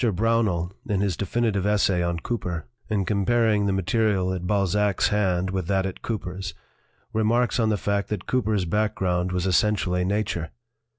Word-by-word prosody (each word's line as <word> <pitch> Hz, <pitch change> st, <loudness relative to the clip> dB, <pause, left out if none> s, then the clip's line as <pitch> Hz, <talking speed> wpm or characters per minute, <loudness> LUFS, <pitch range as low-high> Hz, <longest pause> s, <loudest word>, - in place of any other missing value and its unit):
Brownell, 100 Hz, -5 st, +1 dB
in 100 Hz, -4 st, 0 dB
his 100 Hz, -4 st, 0 dB
definitive 100 Hz, 0 st, 0 dB
essay 100 Hz, -3 st, +2 dB
on 85 Hz, -1 st, -1 dB
Cooper, 90 Hz, -8 st, -3 dB, 0.2 s
in 100 Hz, -3 st, 0 dB
comparing 105 Hz, +1 st, +2 dB
the -, -, +2 dB
material 95 Hz, 0 st, +1 dB
at 90 Hz, -1 st, -4 dB
Balzac's 100 Hz, 0 st, +2 dB
hand 95 Hz, -3 st, +1 dB
with 95 Hz, -3 st, -2 dB
that 95 Hz, -1 st, +1 dB
at 95 Hz, -, -5 dB
Cooper's, 95 Hz, -5 st, -4 dB, 0.6 s
remarks 115 Hz, +3 st, +2 dB
on 110 Hz, -2 st, +3 dB
the 105 Hz, -, +1 dB
fact 100 Hz, +1 st, -1 dB
that 105 Hz, -4 st, -3 dB
Cooper's 110 Hz, -7 st, 0 dB
background 90 Hz, -2 st, 0 dB
was 90 Hz, 0 st, -1 dB
essentially 90 Hz, 0 st, +2 dB
nature. 95 Hz, -4 st, -1 dB
100 Hz, 155 wpm, -25 LUFS, 90-105 Hz, 0.6 s, on